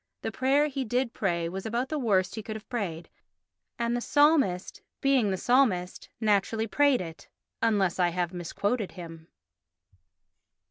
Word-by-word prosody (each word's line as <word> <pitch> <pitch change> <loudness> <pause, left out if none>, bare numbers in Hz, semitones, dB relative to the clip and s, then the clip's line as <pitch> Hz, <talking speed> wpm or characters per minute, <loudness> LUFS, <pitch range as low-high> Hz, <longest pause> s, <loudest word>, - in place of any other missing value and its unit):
The - - -2
prayer 275 +3 +2
he 275 -2 -3
did 245 +1 -1
pray 170 -4 -1
was 190 +3 -5
about 235 +4 -2
the 310 - -2
worst 195 -7 +1
he 220 - -5
could 215 0 -6
have 215 - -9
prayed 185 -9 -3 0.7
and 235 0 0
the 240 - -1
psalmist, 290 - +2 0.2
being 270 -6 +3
the 190 - -1
psalmist, 205 -7 +1
naturally 220 0 +1
prayed 280 +2 +3
it—unless 190 +3 -2
I 175 -1 +4
have 175 0 -2
misquoted 200 +5 -2
him. 165 -2 -10
215 Hz, 145 wpm, -28 LUFS, 180-250 Hz, 0.7 s, I